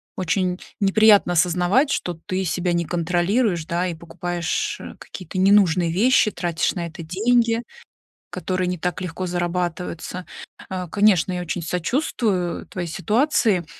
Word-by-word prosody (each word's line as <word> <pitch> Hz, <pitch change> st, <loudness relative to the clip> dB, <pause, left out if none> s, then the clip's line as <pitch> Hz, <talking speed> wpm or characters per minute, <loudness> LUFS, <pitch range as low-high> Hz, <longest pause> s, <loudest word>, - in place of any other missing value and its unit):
Очень 180 Hz, 0 st, -1 dB, 0.2 s
неприятно 205 Hz, -2 st, +5 dB
осознавать, 180 Hz, -, +2 dB
что 175 Hz, -9 st, -2 dB
ты 190 Hz, -1 st, -1 dB
себя 180 Hz, 0 st, -1 dB
не 170 Hz, 0 st, 0 dB
контролируешь, 175 Hz, +2 st, 0 dB
да, 170 Hz, +2 st, -1 dB
и 175 Hz, -, -3 dB
покупаешь, 170 Hz, +1 st, -3 dB
э, -, -, -9 dB
какие-то 185 Hz, 0 st, -8 dB
ненужные 185 Hz, -3 st, +4 dB
вещи, 215 Hz, +3 st, +3 dB
тратишь 175 Hz, -1 st, -1 dB
на 170 Hz, -2 st, -3 dB
это 165 Hz, 0 st, -9 dB
деньги, 230 Hz, +6 st, +2 dB, 0.7 s
которые 185 Hz, -1 st, -2 dB
не 180 Hz, 0 st, -2 dB
так 180 Hz, +1 st, -3 dB
легко 185 Hz, +1 st, -4 dB
зарабатываются. 175 Hz, 0 st, -3 dB, 0.4 s
А, 185 Hz, -1 st, -4 dB
конечно, 195 Hz, -1 st, +3 dB
я 180 Hz, -, -2 dB
очень 175 Hz, 0 st, -4 dB
сочувствую 180 Hz, -, -1 dB
твоей 175 Hz, -2 st, -5 dB
ситуации, 215 Hz, -, +1 dB
180 Hz, 135 wpm, -22 LUFS, 175-200 Hz, 0.7 s, неприятно